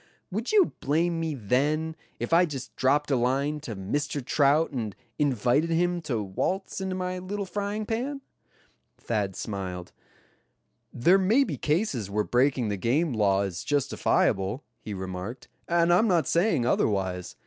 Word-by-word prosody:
Would 220 +6 -2
you 410 -5 +4
blame 165 +4 +1
me 160 -2 -2
then, 145 +8 0 0.2
if - - -2
I 175 +1 +6
just 135 -4 -7
dropped 140 +3 +2
a - - +4
line 135 +5 0
to 120 -7 -6
Mr. 140 +8 -2
Trout 145 +4 +3
and 110 -7 -4 0.2
invited 140 +2 +2
him 175 +1 +1
to 120 -9 -2
waltz 185 - -2
into 190 -1 -2
my 185 0 -3
little 200 +2 -4
frying 205 +3 -3
pan?" 260 +6 -3 0.8
Thad 105 -5 -2
smiled. 95 -4 -5 1.0
"There 175 +11 +4
may 220 +9 +4
be 175 - -3
cases 145 - -1
where 105 +1 0
breaking 125 -1 +2
the 100 - -2
game 135 - +1
law 100 -3 +2
is 95 -2 -4
justifiable," 125 -5 +1 0.2
he 105 - -6
remarked, 95 +6 -6 0.2
"and 170 0 +3
I'm 215 +6 +4
not 170 -7 +3
saying 170 - +2
otherwise. 95 -6 0
145 Hz, 150 wpm, -27 LUFS, 110-175 Hz, 1.0 s, I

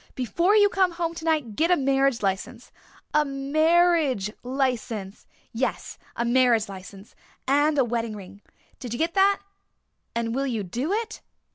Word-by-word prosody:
Before 340 - +1
you 410 -1 +6
come 380 -3 +1
home 335 -1 -2
tonight 315 -9 -1
get 330 +7 +1
a 360 - +4
marriage 270 -3 +1
license 190 -1 -3 0.4
a 300 - +4
marriage 295 - +2
license 245 -6 -3 0.3
yes, 250 +3 -3 0.2
a 235 - -1
marriage 240 -3 +3
license 195 +1 -11 0.3
and 290 +2 +3
a 270 - +5
wedding 230 -2 -2
ring. 200 0 -11 0.4
Did 245 -3 -6
you - - -3
get 330 +4 -1
that? 395 0 +3 0.7
And 230 -1 -1
will 275 +2 -1
you 225 -5 -2
do 245 - -3
it? 435 +1 -3
270 Hz, 150 wpm, -25 LUFS, 230-325 Hz, 0.7 s, you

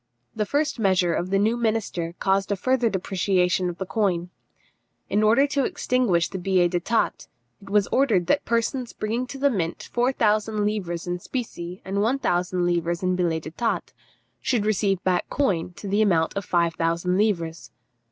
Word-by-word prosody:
The 210 -2 -1
first 290 -1 0
measure 185 -4 +2
of 175 +3 -2
the 195 - +2
new 215 +4 +2
minister 215 -7 -1
caused 195 +1 +1
a - - +2
further 250 +4 +1
depreciation 185 -2 +1
of 175 - -6
the 190 - -4
coin. 180 -4 -1 0.8
In 210 - +3
order 225 +6 +5
to 280 -1 0
extinguish 240 -11 +1
the 190 - -6
billets 180 -1 +2
d'état, 185 +7 0 0.3
it 195 - -13
was 205 0 +3
ordered 225 -10 +3
that 280 +11 +2
persons 235 +2 -1
bringing 230 +4 -2
to 275 - -7
the 280 +1 +2
mint 170 -7 -3
four 245 +2 +2
thousand 215 -3 +1
livres 180 -5 -2
in 175 0 -3
specie 180 -6 -6
and 195 +1 -1
one 235 +6 +2
thousand 180 -6 0
livres 170 0 0
in 185 0 +1
billets 165 -3 -1
d'état, 200 +9 -2 0.5
should 235 -5 0
receive 200 -3 +1
back 185 -1 0
coin 180 -11 0
to 200 - -9
the 200 +2 +2
amount 170 -6 +2
of 200 -1 -3
five 170 -1 +1
thousand 170 +2 0
livres. 170 -6 -1
195 Hz, 175 wpm, -24 LUFS, 175-225 Hz, 0.8 s, order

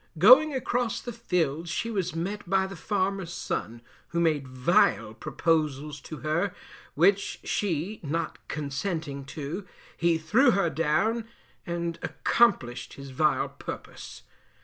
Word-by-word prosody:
Going 255 - +8
across 245 -3 -1
the 240 - -6
fields 170 -8 -1
she 230 - -2
was 185 -6 -2
met 195 +3 -4
by 190 0 +3
the 195 0 -7
farmer's 190 0 -1
son, 120 -8 -4 0.2
who 170 - -2
made 155 -5 +1
vile 130 - +2
proposals 150 +1 -1
to 155 - -8
her, 170 +5 0 0.4
which 195 +5 +3
she 190 +1 -1
not 165 +2 -3
consenting 145 -1 -3
to, 155 +7 -6 0.3
he 170 -1 +2
threw 165 - +4
her 195 -4 +2
down, 215 +9 +1 0.4
and 170 -1 -3
accomplished 130 - +1
his 140 -1 -9
vile 140 0 +2
purpose. - - -8
170 Hz, 125 wpm, -27 LUFS, 150-200 Hz, 0.4 s, Going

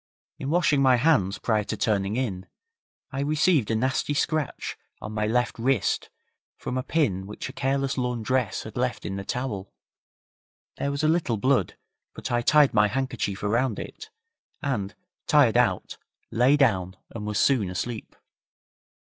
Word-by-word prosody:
In 135 - -4
washing 155 -4 +3
my 130 -2 +6
hands 120 - +2
prior 110 -2 +1
to - - -3
turning 100 -1 0
in, 100 -8 -2 0.6
I 135 - -4
received 150 - +2
a 110 - +1
nasty 130 +5 0
scratch 155 0 -1 0.2
on 105 - -7
my 105 0 -1
left 120 +1 0
wrist 125 -2 +1 0.5
from 125 - -4
a 130 - 0
pin 115 - 0
which 105 - -6
a - - -9
careless 135 0 0
laundress 125 -2 -1
had - - -9
left - - -1
in 95 - -3
the 100 - -4
towel. 105 -5 -4 1.0
There 140 - -1
was 140 +2 -2
a - - +4
little 155 -8 +1
blood, 125 -5 +1 0.4
but - - -5
I 120 0 +2
tied 150 +3 +5
my 105 -1 +5
handkerchief 115 -4 -2
around 115 +2 +1
it, 440 - -8 0.5
and, 105 -9 -2 0.3
tired - - +5
out, - - +1 0.3
lay 125 +5 +4
down 95 -9 +2
and 105 -2 -6
was 105 -1 -1
soon 120 -9 +3
asleep. 110 +5 -5
125 Hz, 155 wpm, -26 LUFS, 105-135 Hz, 1.0 s, my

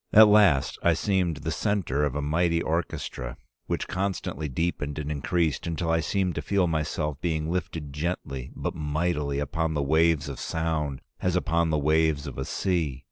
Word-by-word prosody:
"At 110 0 +9
last 100 -10 +4
I 85 -1 +4
seemed 90 -2 +1
the 80 - -3
centre 80 -4 0
of 70 -2 -2
a 75 - -1
mighty 85 +3 +2
orchestra 80 -7 -3 0.3
which - - -2
constantly 95 -5 -2
deepened 75 0 -2
and 75 0 -3
increased 80 +1 0
until 85 0 -1
I 80 - +3
seemed 90 +3 0
to - - -3
feel 100 -2 +2
myself 75 -2 -2
being 80 -2 -1
lifted 80 -5 -3
gently 75 -5 -3
but - - -3
mightily 75 -1 -1
upon 80 +3 -1
the 70 - +1
waves 80 +1 +3
of 70 -3 -6
sound 80 -4 -2 0.2
as 90 -1 0
upon 85 -2 +1
the 75 - +2
waves 75 0 +2
of 70 -3 -6
a 65 - -2
sea. 80 -9 -1
80 Hz, 175 wpm, -27 LUFS, 75-85 Hz, 0.3 s, At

